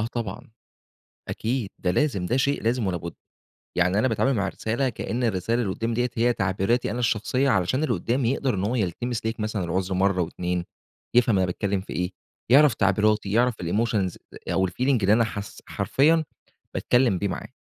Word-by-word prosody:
آه 110 - 0
طبعًا. 110 -3 -5 0.8
أكيد 115 -2 -2
ده 90 - 0
لازم 100 -4 0
ده 120 +8 +1
شيء 140 +2 0
لازم 115 -2 +1
ولا 90 - -1
بُد 85 0 -7 0.6
يعني 90 +3 +3
أنا 130 - +3
باتعامل 130 +3 +1
مع 100 -5 0
الرسالة 115 +7 -1
كأن 120 +1 -3
الرسالة 115 +2 0
اللي 100 -5 -1
قدَّامي 115 +2 -2
ديّة 125 +1 0
هي 120 +1 +3
تعبيراتي 100 +4 0
أنا 120 - -3
الشخصية 125 +4 +1
علشان 95 - +1
اللي 135 -6 +1
قدّامي 120 +6 0
يقدر 135 -2 0
إن 95 - -2
هو 120 - 0
يلتمس 115 +3 -2
ليك 115 +1 -2
مثلًا 110 -2 -2
العذر 95 +2 -1
مرة 95 0 +2
و2، 90 +1 -2 0.5
يفهم 120 -4 +4
أنا 95 - +3
باتكلم 95 +2 -1
في - - -8
إيه 90 +1 -2 0.4
يعرف 145 0 +7
تعبيراتي 105 +1 +2
يعرف 120 +3 +3
الemotions 100 0 0 0.4
أو 95 0 +2
الfeeling 90 - -7 0.3
اللي 100 +2 +4
أنا 115 +1 +4
حاس 105 -3 -6
حرفيًا 160 +4 +2 0.5
باتكلم 120 -6 +2
بيه 100 +3 -1
معاه، - - -5
110 Hz, 185 wpm, -25 LUFS, 95-120 Hz, 0.8 s, يعرف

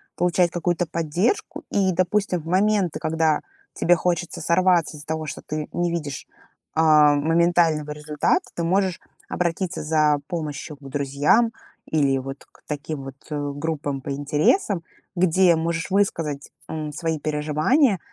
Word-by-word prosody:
получать 175 0 +2
какую-то 175 0 0
поддержку. 170 - -1
И, 195 -2 +2
допустим, 185 +1 +1
в - - -16
моменты, 190 -2 +2
когда 160 -1 +1 0.3
тебе 175 - +3
хочется 175 0 -1
сорваться 170 -1 +2
из-за 150 - -12
того, 160 0 -2
что 145 - -6
ты 155 0 -4
не 175 0 0
видишь, 150 -5 -4 0.5
а, 155 -2 +6
моментального 165 0 +2
результата, 150 - 0
ты 170 - -2
можешь 185 +1 +1 0.3
обратиться 180 +1 -2
за 150 -1 +3
помощью 150 -3 -5
к - - -33
друзьям 145 - +2 0.4
или 140 -3 +2
вот 135 +1 -8
к - - -24
таким 150 -1 -4
вот, 135 -1 -8 0.2
э, 145 -1 -2
группам 145 -2 -3
по 140 - -5
интересам. 155 - +1 0.3
Где 180 0 +4
можешь 165 +2 -2
высказать, 165 -8 0 0.2
м, 155 -1 -4
свои 160 +1 -2
переживания 155 - +2
160 Hz, 140 wpm, -23 LUFS, 150-175 Hz, 0.5 s, а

